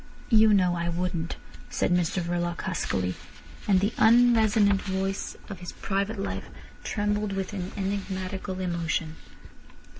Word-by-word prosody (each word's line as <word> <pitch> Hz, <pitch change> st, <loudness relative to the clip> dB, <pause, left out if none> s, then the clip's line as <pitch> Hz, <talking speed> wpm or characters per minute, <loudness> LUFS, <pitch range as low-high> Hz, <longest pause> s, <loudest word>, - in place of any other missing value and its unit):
"You 220 Hz, -1 st, +7 dB
know 185 Hz, -3 st, +4 dB
I 170 Hz, 0 st, -1 dB
wouldn't," 170 Hz, -1 st, -2 dB, 0.3 s
said -, -, 0 dB
Mr 175 Hz, 0 st, +1 dB
Verloc 175 Hz, 0 st, -2 dB
huskily, 95 Hz, -, -1 dB, 0.5 s
and 195 Hz, -2 st, +5 dB
the 205 Hz, +3 st, +1 dB
unresonant 220 Hz, -4 st, +5 dB
voice 195 Hz, 0 st, -3 dB
of 195 Hz, -3 st, -7 dB
his 180 Hz, -, -7 dB
private 200 Hz, +3 st, -2 dB
life 200 Hz, -, -4 dB, 0.3 s
trembled 210 Hz, -1 st, -1 dB
with 195 Hz, +1 st, -3 dB
an 185 Hz, -2 st, -4 dB
enigmatical 190 Hz, -1 st, -3 dB
emotion. 170 Hz, -3 st, -2 dB
190 Hz, 125 wpm, -27 LUFS, 175-205 Hz, 0.5 s, You